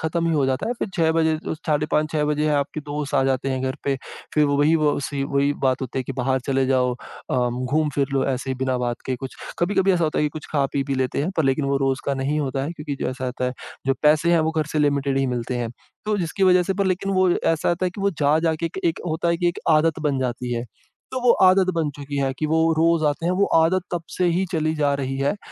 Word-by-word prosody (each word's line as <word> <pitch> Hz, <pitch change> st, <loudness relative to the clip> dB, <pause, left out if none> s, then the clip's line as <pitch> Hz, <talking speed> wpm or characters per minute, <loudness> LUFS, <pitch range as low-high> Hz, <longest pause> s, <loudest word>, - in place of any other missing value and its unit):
खत्म 165 Hz, +1 st, -1 dB
ही -, -, +1 dB
हो 145 Hz, -3 st, +2 dB
जाता 130 Hz, +1 st, -1 dB
है। -, -, +1 dB
फिर -, -, -2 dB
6 160 Hz, -1 st, +2 dB
बजे 160 Hz, -1 st, +2 dB, 0.3 s
साढ़े 150 Hz, -1 st, +1 dB
5, 155 Hz, +1 st, +2 dB
6 150 Hz, -1 st, +1 dB
बजे 150 Hz, +1 st, 0 dB
आपके 145 Hz, +2 st, -1 dB
दोस्त 145 Hz, -1 st, -4 dB
आ -, -, +4 dB
जाते 135 Hz, 0 st, 0 dB
हैं 130 Hz, 0 st, -2 dB
घर 130 Hz, +1 st, -2 dB
पे, 140 Hz, -1 st, +1 dB, 0.4 s
फिर 150 Hz, -, +4 dB
वो 145 Hz, 0 st, +1 dB
वही 150 Hz, +3 st, +4 dB
वो 150 Hz, -2 st, +1 dB
सी 140 Hz, 0 st, -3 dB
वही 140 Hz, +1 st, +1 dB
बात 130 Hz, -1 st, +2 dB
होती 130 Hz, +1 st, -4 dB
है -, -, 0 dB
कि -, -, -4 dB
बाहर 130 Hz, +1 st, +1 dB
चले 135 Hz, -1 st, +2 dB
जाओ 130 Hz, -1 st, +2 dB
अ, -, -, -9 dB, 0.2 s
घूम-फिर 140 Hz, +3 st, 0 dB
लो 135 Hz, -, +2 dB
ऐसे 130 Hz, +1 st, -5 dB
ही -, -, -1 dB
बिना 130 Hz, 0 st, 0 dB
बात 120 Hz, -1 st, -1 dB
के 130 Hz, -, -1 dB
कुछ। 130 Hz, +1 st, -8 dB, 0.2 s
कभी-कभी 190 Hz, +2 st, +2 dB
ऐसा 170 Hz, -2 st, +2 dB
होता 155 Hz, -, -1 dB
है 150 Hz, -, +2 dB
कि -, -, +2 dB
कुछ 150 Hz, -, -12 dB
खा 140 Hz, -3 st, +2 dB
पी, 140 Hz, -, 0 dB
पी 135 Hz, 0 st, -2 dB
लेते 130 Hz, +1 st, -1 dB
हैं 170 Hz, -, -1 dB
पर 160 Hz, -, +2 dB
लेकिन 135 Hz, +2 st, +1 dB
वो 140 Hz, 0 st, +1 dB
रोज़ 135 Hz, 0 st, 0 dB
का 140 Hz, -, +1 dB
नहीं 135 Hz, +3 st, -1 dB
होता 135 Hz, -1 st, -2 dB
है 155 Hz, -, -4 dB
क्योंकि 150 Hz, -3 st, -5 dB
जो -, -, 0 dB
ऐसा 130 Hz, 0 st, -5 dB
होता 125 Hz, 0 st, -3 dB
है 125 Hz, -, -1 dB, 0.3 s
जो 135 Hz, -, +3 dB
पैसे 155 Hz, +3 st, +4 dB
हैं 170 Hz, -, +4 dB
वो 160 Hz, 0 st, +1 dB
घर 155 Hz, -, +1 dB
से 155 Hz, -, 0 dB
लिमिटेड 140 Hz, -2 st, +1 dB
ही 135 Hz, -, +1 dB
मिलते 125 Hz, 0 st, -2 dB
हैं। 120 Hz, -1 st, -2 dB, 0.3 s
तो 210 Hz, 0 st, 0 dB
जिसकी 175 Hz, +2 st, -2 dB
वजह 180 Hz, -1 st, +5 dB
से 195 Hz, +2 st, -1 dB
पर 200 Hz, 0 st, 0 dB
लेकिन 190 Hz, +1 st, 0 dB
वो 185 Hz, 0 st, +3 dB
ऐसा 165 Hz, -2 st, +1 dB
होता 175 Hz, +2 st, +1 dB
है -, -, -1 dB
कि 190 Hz, -, -9 dB
वो 200 Hz, 0 st, +2 dB
जा, 150 Hz, -3 st, +2 dB
जा 160 Hz, 0 st, +1 dB
के 165 Hz, +2 st, -2 dB
एक 165 Hz, -, -6 dB
एक 170 Hz, -1 st, 0 dB
होता 160 Hz, +1 st, -1 dB
है 170 Hz, -, +2 dB
कि 175 Hz, +1 st, +1 dB
एक 175 Hz, -, -3 dB
आदत 160 Hz, +1 st, +3 dB
बन 135 Hz, -2 st, 0 dB
जाती 125 Hz, -1 st, -2 dB
है। 120 Hz, 0 st, -3 dB, 0.5 s
तो 255 Hz, -, -2 dB
वो 245 Hz, -1 st, +4 dB
आदत 185 Hz, 0 st, +5 dB
बन 160 Hz, -2 st, 0 dB
चुकी 145 Hz, 0 st, -6 dB
है 135 Hz, -1 st, 0 dB
कि 155 Hz, -, 0 dB
वो 160 Hz, +1 st, +1 dB, 0.2 s
रोज़ 165 Hz, 0 st, +3 dB
आते 150 Hz, +3 st, -2 dB
हैं, 180 Hz, -, +2 dB
वो 195 Hz, +2 st, +2 dB, 0.2 s
आदत 180 Hz, +3 st, +2 dB
तब 175 Hz, -1 st, -1 dB
से 180 Hz, -, +1 dB
ही 175 Hz, +2 st, +1 dB
चली 155 Hz, -1 st, 0 dB
जा 145 Hz, -2 st, +1 dB
रही 135 Hz, -1 st, -3 dB
है। 140 Hz, +5 st, +1 dB
अ, 205 Hz, -, -7 dB
150 Hz, 285 wpm, -23 LUFS, 135-165 Hz, 0.5 s, वजह